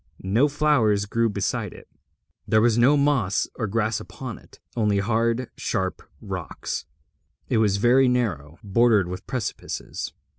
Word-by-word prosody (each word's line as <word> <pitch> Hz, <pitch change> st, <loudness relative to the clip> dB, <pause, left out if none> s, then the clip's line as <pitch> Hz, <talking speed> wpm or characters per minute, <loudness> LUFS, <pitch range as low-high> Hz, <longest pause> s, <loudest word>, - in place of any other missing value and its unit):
No 110 Hz, +10 st, +3 dB
flowers 140 Hz, -9 st, +2 dB
grew 115 Hz, +3 st, +1 dB
beside 105 Hz, -, -2 dB
it, -, -, -14 dB, 0.6 s
there 110 Hz, +1 st, +4 dB
was 115 Hz, 0 st, +3 dB
no 125 Hz, +5 st, +5 dB
moss 140 Hz, -9 st, +1 dB
or 110 Hz, -, -3 dB
grass 110 Hz, +1 st, 0 dB
upon -, -, -8 dB
it, -, -, -20 dB, 0.2 s
only 105 Hz, -3 st, +2 dB
hard 115 Hz, +4 st, 0 dB
sharp 95 Hz, 0 st, -2 dB, 0.2 s
rocks. -, -, -5 dB, 0.6 s
It -, -, +2 dB
was 105 Hz, -3 st, +3 dB
very 125 Hz, +5 st, +4 dB
narrow, 85 Hz, -, -1 dB
bordered 105 Hz, -1 st, +3 dB
with 90 Hz, +1 st, -7 dB
precipices. 125 Hz, -6 st, -4 dB
110 Hz, 140 wpm, -24 LUFS, 100-125 Hz, 0.6 s, no